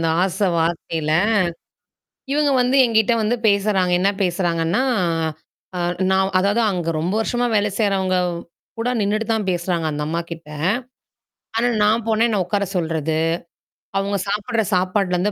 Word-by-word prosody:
அந்த 165 -1 +1
ஆசை 190 +1 0
வார்த்தையில. 165 -1 -1 1.2
இவங்க 290 0 +2
வந்து 250 +2 +2
என்கிட்ட 225 0 +3
வந்து 220 +3 +1
பேசுறாங்க. 200 -3 +2
என்ன 195 +2 +3
பேசுறாங்கன்னா, 175 +2 0 1.0
அ - - -2 0.3
நான் 190 0 +2
அதாவது 200 +5 +2
அங்க 175 -3 -2
ரொம்ப 175 +5 -1
வருஷமா 245 +2 0
வேல 210 0 +2
செய்றவங்க 195 -3 +1 0.6
கூட 235 +2 0
நின்னுட்டு 210 +2 0
தான் 215 -3 -1
பேசுறாங்க. 175 -2 -1
அந்த 150 0 -3
அம்மாகிட்ட. 165 -1 -5 1.1
ஆனா 240 +2 +2
நான் 220 +2 +2
போன 225 +1 +3
என்ன 210 -3 0
உட்கார 200 +3 0
சொல்றது. 160 -2 -1 0.8
அவங்க 200 +1 0
சாப்பிடுற 210 +2 -1
சாப்பாட்டுலருந்து. 185 +1 +1
195 Hz, 130 wpm, -21 LUFS, 170-215 Hz, 1.2 s, என்கிட்ட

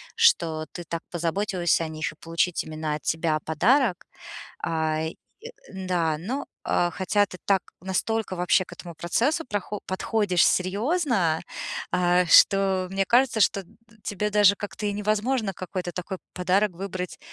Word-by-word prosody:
что 170 - +3
ты 175 - -7
так 165 0 -4
позаботилась 175 +1 0
о 165 - -1
них, 155 0 -3
и - - -23
получить 165 +1 0
именно 155 -1 -3
от 150 - -8
тебя 160 -1 0
подарок. 205 - +2 0.6
А, 160 -1 0
и, 160 +1 -5 0.3
э, - - -5 0.2
н 190 -1 -6
да, 165 -4 +1
но, 245 - -4 0.2
а, 175 - +1
хотя 195 +3 +1
ты 180 - -10
так, 195 -2 +3 0.2
настолько 190 +2 -1
вообще 180 +1 +2
к - - -11
этому 170 -2 -10
процессу 275 - 0
прохо 205 -1 -3
подходишь 190 -1 +1
серьёзно, 200 - +1 0.5
а, 180 0 +3
что 190 +1 +5
мне 195 0 +1
кажется, 240 +2 +3
что, 200 +1 +3
д 175 - -23 0.3
тебе 210 +1 -2
даже 205 -1 +5
как-то 205 +1 -5
и - - 0
невозможно 215 +2 0
какой-то 185 0 -5
такой 185 +1 -5 0.2
подарок 185 +3 +2
выбрать, 185 0 -5
185 Hz, 155 wpm, -25 LUFS, 170-210 Hz, 0.6 s, что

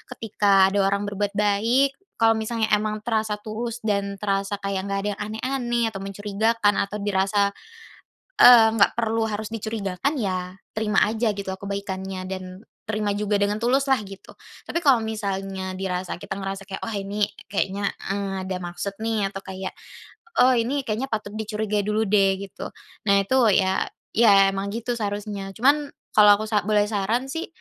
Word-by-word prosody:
ketika 200 -3 +3
ada 205 - +1
orang 200 +1 0
berbuat 205 0 -2
baik, 225 +7 +2 0.3
kalau 225 0 +5
misalnya 220 0 -1
emang 215 0 -2
terasa 215 -1 -1
tulus, 225 +2 -5
dan 200 -3 -2
terasa 200 0 -1
kayak 195 -1 -2
nggak 195 - 0
ada - - +1
yang - - -9
aneh-aneh, 240 +2 -1
atau 195 -3 -5
mencurigakan, 205 +2 0
atau 205 +2 -2
dirasa, 200 0 +1 0.8
eee, 235 -3 +9
nggak 200 - +5
perlu 225 -1 0
harus 215 -1 -3
mencurigakan, 220 +4 -2
ya 185 -3 -2 0.2
terima 215 -1 +2
aja 220 0 0
gitu 200 -1 -6
kebaikannya. 190 -1 -5
Dan, 185 0 -7 0.2
terima 215 -1 -1
juga 210 0 0
dengan 205 +1 +1
tulus 255 +4 +2
lah, 265 - +5
gitu. 195 0 -12 0.4
Tapi 340 - -1
kalau 265 -5 +5
misalnya 195 -3 -3
dirasa 185 -2 -3
kita - - -5
ngerasa 195 0 -5
kayak, 195 - -5
wah 225 - -4
ini 205 0 -1 0.2
kayaknya, 200 0 -1 0.2
eee, 195 -1 -3
ada 185 0 -3
maksud 185 +3 -5
nih, 220 -3 -1
atau 195 - -6
kayak, 190 -1 -6 0.7
oh 255 0 +6
ini 245 +5 0
kayaknya 230 +5 -2
patut 215 -1 -3
dicurigai 215 -1 -2
dulu 210 +1 0
deh, 195 -1 +3
gitu. 200 -1 -7 0.4
Nah 200 - +5
itu 260 - +1 0.2
ya 190 0 +1 0.3
ya 200 -4 +6
emang 195 +1 -3
gitu, 235 +2 -3
seharusnya. 205 -2 -4
Cuman, 280 +7 +2 0.2
kalau 210 -1 +8
aku - - -2
sa 210 -4 +1
boleh 210 -1 +2
saran 220 +5 -1
sih, 325 +3 -4
205 Hz, 165 wpm, -24 LUFS, 195-220 Hz, 0.8 s, eee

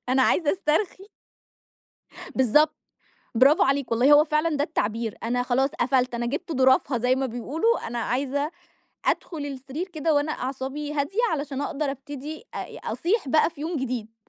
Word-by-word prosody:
أنا 260 +1 +3
عايزة 295 +3 +3
أسترخي. 370 +2 -1 1.3
بالضبط، 295 +5 +4 0.6
برافو 275 - +5
عليك، 275 -1 +1
والله 245 +5 +4
هو 295 +1 +8
فعلًا 305 0 +1
ده 285 - +1
التعبير، 225 -7 -2
أنا 245 +2 0
خلاص 260 +2 +1
قفلت، 255 -4 +1
أنا 235 0 -2
جبت 295 +6 -3
ضُرفها 260 -1 +3
زي 250 +2 +2
ما 265 0 -1
بيقولوا، 290 - -1
أنا 240 +1 -4
عايزة 275 +5 -1 0.6
أدخل 330 - -1
السرير 275 +6 -5
كده 320 -2 0
وأنا 290 +1 +1
أعصابي 270 +3 -4
هادية، 300 +8 -2
علشان 285 -3 -3
أقدَر 285 0 -2
أبتدي 285 - -7
أ - - -6
أصيح 365 - 0
بقى 310 +4 +3
في 320 -3 -15
يوم 325 +3 -2
جديد. 245 -5 -4
280 Hz, 155 wpm, -25 LUFS, 255-305 Hz, 1.3 s, هو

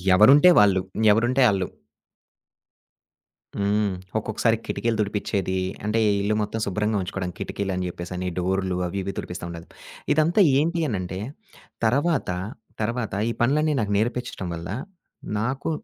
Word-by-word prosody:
ఎవరుంటే 140 - +7
వాళ్ళు. 95 -3 +4 0.3
ఎవరుంటే 120 +4 +2
ఆళ్ళు. 95 -2 0 1.9
హ్మ్. 100 0 +1 0.2
ఒక్కొక్కసారి 110 +1 +1
కిటికీలు 115 -1 -1
తుడిపిచేది, 100 -2 -1 0.3
అంటే 110 +2 +1 0.2
ఇల్లు 105 +2 0
మొత్తం 105 +2 -3
శుభ్రంగా 105 +2 0
ఉంచుకోవడం, 90 0 -4
కిటికీలని 95 -2 -3
చెప్పేసని 90 +1 -5
డోర్లు 95 0 0
అవి 100 +3 -4
ఇవి 100 - -3
తుడిపిస్తా 90 -1 -5
ఉండేది. 85 0 -9 0.5
ఇదంతా 160 +7 +3 0.2
ఏంటి 165 +2 0
అనంటే 95 -2 -3 0.7
తర్వాత, 140 - +1 0.5
తర్వాత 115 -2 -2 0.2
ఈ - - -3
పనులన్నీ 150 +5 +2
నాకు 105 -1 -1
నేర్పిచటం 115 -4 -2
వల్ల 85 +2 -7 0.7
నాకు 130 +7 -2
105 Hz, 115 wpm, -24 LUFS, 95-120 Hz, 1.9 s, ఎవరుంటే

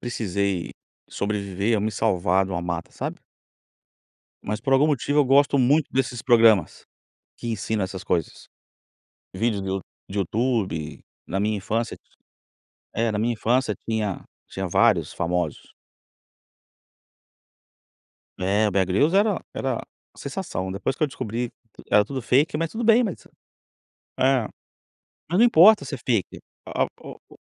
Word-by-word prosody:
precisei 100 -6 -2 0.4
sobreviver 100 +1 -1
ou - - 0
me 110 +1 0
salvar 90 +1 +1
de 95 - -7
uma 85 -2 -2
mata 85 -1 -4
sabe. - - -5 1.2
Mas 105 +1 -3
por 135 - -1
algum 135 +3 +5
motivo 145 0 0
eu - - +4
gosto 140 +1 +4
muito 140 +4 +3
desses 125 -2 -1
programas, 115 -7 +4 0.5
que 120 - -6
ensinam 110 -2 -1
essas 95 +1 -7
coisas, 85 -6 -2 0.9
vídeos 105 0 0
do 95 0 -2 0.3
de 100 - -3
YouTube, 100 -7 -1 0.3
na 95 - -2
minha 105 0 0
infância, 115 +4 -2 1.0
eh, 115 -1 0
na 105 - -2
minha 115 +2 0
infância 120 0 +1
tinha 105 -4 -2 0.2
tinha 95 0 -4
vários 90 -4 +2
famosos. 85 -2 -3 2.7
É 100 +4 +2
o - - -2
Bear 95 -1 +1
Grylls 140 - +2
era 210 +1 +2
era - - -2 0.4
sensação, 130 - -4
depois 100 +7 -2
que - - -4
eu - - +5
descobri, 120 -3 -4 0.4
era 105 0 +5
tudo 130 +2 -5
fake 140 +6 +2
mas 165 0 -2
tudo 230 +1 -4
bem, 230 +2 +6
né, 205 -6 -1 2.2
mas 180 - +1
não 235 - +7
importa 210 -5 +7
se 140 - -4
é - - -8
fake 115 -6 -1 0.3
a - - 0
a - - -1
o - - -10
o - - -17
110 Hz, 140 wpm, -24 LUFS, 95-130 Hz, 2.7 s, não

